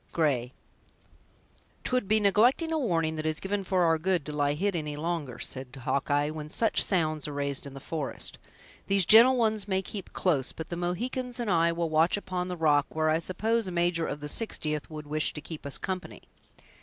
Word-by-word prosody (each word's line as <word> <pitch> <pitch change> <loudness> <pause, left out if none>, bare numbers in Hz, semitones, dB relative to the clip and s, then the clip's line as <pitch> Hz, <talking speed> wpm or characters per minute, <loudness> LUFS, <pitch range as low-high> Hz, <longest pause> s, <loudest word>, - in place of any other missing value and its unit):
—Gray 135 -7 +1 1.3
"'Twould 250 -5 0
be 215 +2 +3
neglecting 230 - +3
a 320 - +1
warning 165 - 0
that 155 - -4
is 155 0 -1
given 200 +1 -2
for 185 -1 +1
our 165 -1 +3
good 175 -3 0
to 150 - -5
lie 145 -1 +1
hid 195 +4 0
any 150 -3 -3
longer," 155 -6 -3
said 130 +1 -6
Hawkeye 145 +3 0
"when 155 -1 -7
such 225 +7 +4
sounds 155 -6 0
are 150 - -5
raised 140 0 -2
in 135 - -10
the - - -7
forest. 150 0 -3 0.5
These 195 -2 +3
gentle 235 +7 +8
ones 220 -3 +1
may 190 -1 0
keep 200 0 -7
close, 145 -8 0
but 160 - -7
the 175 - -3
Mohicans 245 +8 -3
and 230 -4 -1
I 170 -1 +3
will 165 -1 -2
watch 160 +5 +3
upon 185 -3 -3
the 180 -1 -4
rock, 150 -3 +3
where 155 0 +1
I 160 - +2
suppose 220 +5 -1
a - - -4
major 170 -1 0
of 145 - -5
the 150 - -4
Sixtieth 155 -7 -2
would 155 -1 -7
wish 155 +1 0
to - - -6
keep 155 -1 -8
us 140 - 0
company." 185 -1 -5
165 Hz, 205 wpm, -28 LUFS, 150-195 Hz, 1.3 s, gentle